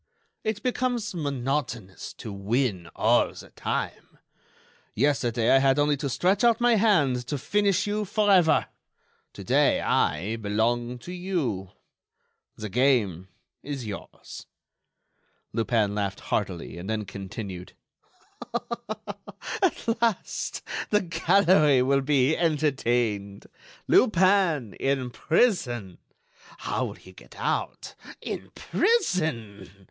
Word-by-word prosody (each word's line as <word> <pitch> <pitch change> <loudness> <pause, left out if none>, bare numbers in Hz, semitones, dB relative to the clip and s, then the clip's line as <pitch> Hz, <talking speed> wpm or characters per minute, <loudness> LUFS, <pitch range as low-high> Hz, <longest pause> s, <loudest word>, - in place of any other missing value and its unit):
It 215 -1 -2
becomes 245 -3 -1
monotonous 135 - -3
to 110 - -8
win 100 -3 -1
all - - +3
the - - -12
time. - - -4 0.8
Yesterday 120 -5 +1
I 135 - +6
had 135 0 +3
only 145 0 +3
to 140 0 -3
stretch 190 - +1
out 235 -2 +4
my 240 0 +4
hand 155 - +2
to 145 - -2
finish 200 +6 +1
you 210 +1 -1
forever. 195 -5 +3 0.7
Today - - +2
I 95 +9 0
belong 115 +3 -1
to 180 - -6
you. 165 - -2 0.9
The 110 - -6
game 105 -6 +1 0.3
is 140 -4 -5
yours." 105 -2 -9 1.1
Lupin 110 -2 +1
laughed 100 -2 -3
heartily 90 -4 -2
and 95 +4 -7
then 110 -1 -2
continued: 95 -1 -7 1.9
"At 235 - 0
last 230 -5 -1 0.3
the 210 0 +3
gallery 165 -5 +4
will 135 +1 +2
be 140 +1 +2
entertained! 120 -11 0 0.4
Lupin 185 - +3
in 135 -2 0
prison! 120 - 0 0.6
How - - -2
will - - -5
he - - -15
get - - -16
out? - - -2 0.3
In - - -6
prison!... 155 - 0
135 Hz, 105 wpm, -26 LUFS, 110-185 Hz, 1.9 s, I